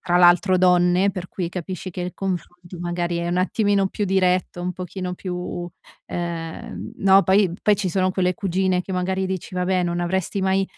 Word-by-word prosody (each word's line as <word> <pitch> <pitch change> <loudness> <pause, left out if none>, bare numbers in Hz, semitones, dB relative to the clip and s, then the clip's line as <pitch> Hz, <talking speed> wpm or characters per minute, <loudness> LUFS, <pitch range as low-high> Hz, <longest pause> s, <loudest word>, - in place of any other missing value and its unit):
tra 175 -1 +1
l'altro 180 +2 +5
donne, 180 +1 +4
per 185 -2 -6
cui 180 -3 -3
capisci 185 +1 -5
che 180 - -6
il 180 - -4
confronto 180 -2 -5
magari 175 0 -2
è 170 - -2
un 175 - 0
attimino 200 +1 +2
più 205 - -2
diretto, 185 -2 +1
un 180 - -2
pochino 180 0 -5
più, 180 -1 -5 0.4
ehm 165 - -5
no, 195 0 +6
poi 190 -2 +3
poi 210 - +5
ci 195 -1 -1
sono 185 +1 +1
quelle 180 -1 +1
cugine 190 -3 0
che 190 - -6
magari 190 +1 -1
dici: 185 -1 -5
"Va 180 - 0
beh, 185 0 +1
non 175 0 -1
avresti 190 +2 -1
mai 190 0 +2
180 Hz, 190 wpm, -22 LUFS, 175-190 Hz, 0.4 s, no